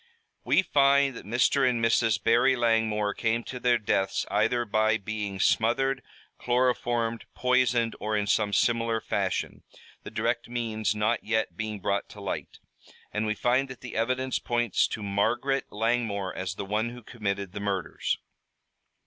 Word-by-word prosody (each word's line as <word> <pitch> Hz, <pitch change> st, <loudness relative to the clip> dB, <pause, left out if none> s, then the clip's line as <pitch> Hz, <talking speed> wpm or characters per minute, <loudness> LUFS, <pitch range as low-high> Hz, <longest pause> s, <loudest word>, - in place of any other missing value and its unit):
"We 190 Hz, -, +3 dB
find 140 Hz, -4 st, +3 dB
that 100 Hz, -, -10 dB
Mr. 125 Hz, +4 st, +3 dB
and 120 Hz, -2 st, 0 dB
Mrs. 115 Hz, -3 st, +2 dB
Barry 120 Hz, +3 st, +4 dB
Langmore 110 Hz, -3 st, +1 dB
came 115 Hz, +2 st, 0 dB
to 125 Hz, -, -7 dB
their 120 Hz, -1 st, +3 dB
deaths 100 Hz, -3 st, 0 dB
either 115 Hz, +4 st, +2 dB
by 110 Hz, +1 st, +2 dB
being 105 Hz, -2 st, -4 dB
smothered, 135 Hz, +7 st, +2 dB, 0.4 s
chloroformed, 120 Hz, -2 st, 0 dB
poisoned, 125 Hz, -2 st, +2 dB
or 105 Hz, 0 st, -1 dB
in 105 Hz, -, 0 dB
some 105 Hz, 0 st, +1 dB
similar 115 Hz, +2 st, +2 dB
fashion, 95 Hz, -4 st, -2 dB, 0.4 s
the -, -, -8 dB
direct 120 Hz, 0 st, -1 dB
means 110 Hz, -4 st, -1 dB
not 105 Hz, +3 st, 0 dB
yet 110 Hz, -5 st, -1 dB
being 110 Hz, +1 st, -4 dB
brought 100 Hz, +2 st, -1 dB
to 105 Hz, -, -12 dB
light, 100 Hz, -, -5 dB, 0.6 s
and 105 Hz, +1 st, -1 dB
we 105 Hz, -, 0 dB
find 125 Hz, +5 st, +1 dB
that 130 Hz, -, -9 dB
the 125 Hz, -, -8 dB
evidence 130 Hz, +3 st, 0 dB
points 120 Hz, -4 st, +1 dB
to 105 Hz, -, -5 dB
Margaret 120 Hz, +7 st, 0 dB
Langmore 110 Hz, -4 st, -1 dB
as 95 Hz, 0 st, -4 dB
the 100 Hz, -, -5 dB
one 105 Hz, +4 st, -1 dB
who 120 Hz, 0 st, -10 dB
committed 100 Hz, -4 st, -3 dB
the 105 Hz, -, -6 dB
murders." 100 Hz, -3 st, -2 dB
115 Hz, 155 wpm, -27 LUFS, 105-120 Hz, 0.6 s, Barry